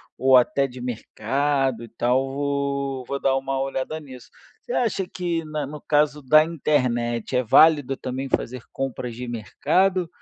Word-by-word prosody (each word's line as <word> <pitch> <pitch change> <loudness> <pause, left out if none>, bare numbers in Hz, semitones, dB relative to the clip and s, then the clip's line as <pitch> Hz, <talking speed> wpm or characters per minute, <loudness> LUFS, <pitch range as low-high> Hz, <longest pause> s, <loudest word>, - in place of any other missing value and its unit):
ou 130 0 +5
até 135 +2 +2
de 125 0 -11
mercado 130 +2 -1
e - - -9
tal, 125 +4 0
vou 140 -1 -2
vou 140 +2 -3
dar 135 -1 +2
uma 135 0 -2
olhada 135 +3 -3
nisso. 130 -5 -12 0.3
Você 485 - -9
acha 200 -6 0
que 175 -2 -3
na 155 -2 -3
no 150 +1 -8
caso 150 0 +1
da 155 +4 +6
internet 125 -7 -1
é 125 - +3
válido 140 +2 +5
também 130 +1 -5
fazer 125 0 -2
compras 125 -3 -4
de 125 0 -6
mercado, 170 - 0
135 Hz, 160 wpm, -23 LUFS, 125-150 Hz, 0.3 s, da